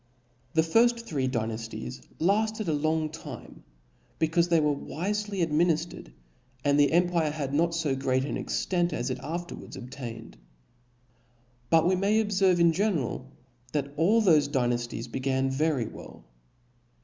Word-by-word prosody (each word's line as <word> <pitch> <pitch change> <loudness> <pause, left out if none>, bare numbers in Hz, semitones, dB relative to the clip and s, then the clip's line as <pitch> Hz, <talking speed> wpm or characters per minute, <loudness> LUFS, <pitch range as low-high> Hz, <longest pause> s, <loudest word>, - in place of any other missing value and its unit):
The 160 - +5
three 225 +9 +5 0.4
firft - - 0
Dynafties 115 - -4 0.2
lafted 215 +4 +1
a 160 - +1
long 155 +1 0
time, 150 -6 -10 0.6
becaufe 170 +2 +2
they 170 -1 +4
were 150 -1 +2
wifely 195 +6 -2
adminiftered, 165 +1 0 0.6
and 145 0 +3
the 145 - +5
empire 170 -2 +2
had 145 -2 -4
not 165 +3 +2
fo 155 -5 0
great 130 0 0
an - - -3
extent 175 -2 -1
as 125 +2 -2
it - - -3
afterwards 175 +2 -6
obtained. 120 -3 -8 1.3
But 165 0 +5
we 185 - +3
may 200 +4 +2
obfcrve 190 -3 +2
in 170 -1 +4
general 160 - -1 0.4
that 140 -1 -2
all 205 +9 +3
thofe 155 -7 +4
Dynafties 120 -4 -1
began 135 +1 0
very 140 -3 +1
well. - - -11
155 Hz, 135 wpm, -28 LUFS, 135-175 Hz, 1.3 s, The